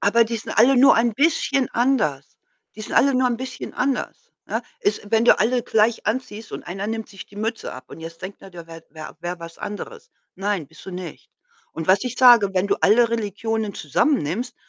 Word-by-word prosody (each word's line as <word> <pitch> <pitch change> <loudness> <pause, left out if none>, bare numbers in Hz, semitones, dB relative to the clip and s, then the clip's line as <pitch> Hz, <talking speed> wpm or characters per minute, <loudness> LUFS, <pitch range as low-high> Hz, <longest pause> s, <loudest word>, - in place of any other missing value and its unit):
Aber, 230 +4 +4
die 230 +1 -3
sind 220 - -6
alle 250 +5 +6
nur 265 +3 +7
ein 230 +1 +2
bisschen 280 -1 +1
anders. 220 - 0 0.4
Die 215 - -10
sind 215 - -6
alle 275 0 +4
nur 255 0 +3
ein 240 - -1
bisschen 260 +1 -7
anders, 260 0 -3
ne? - - -2 0.2
Es 410 -3 0
wenn 225 0 +3
du - - +6
alle 245 +2 +1
gleich 225 +1 +1
anziehst 220 -2 -3
und - - -7
einer 195 +3 -5
nimmt 225 0 -4
sich 195 -2 -11
die 205 - -18
Mütze 225 +2 -3
ab 130 - -10
und - - -11
jetzt 165 +2 -10
denkt 190 +2 -8
der, 195 - -13
der 170 -2 -11
wär 165 0 -11
wär 155 +1 -10
wär 175 +1 -4
was 165 0 -10
anderes. 460 - -8 0.2
„Nein, 195 -5 -2
bist - - -16
du - - -6
nicht.“ 180 -1 -8 0.4
Und 160 - -5
was 190 +2 +5
ich 250 -1 -3
sage, 240 -6 +7
wenn 185 +1 +1
du - - +1
alle 230 +3 +5
Religionen 220 -1 -2
zusammen 275 - +1
nimmst, 205 - -4
220 Hz, 215 wpm, -22 LUFS, 185-245 Hz, 0.4 s, nur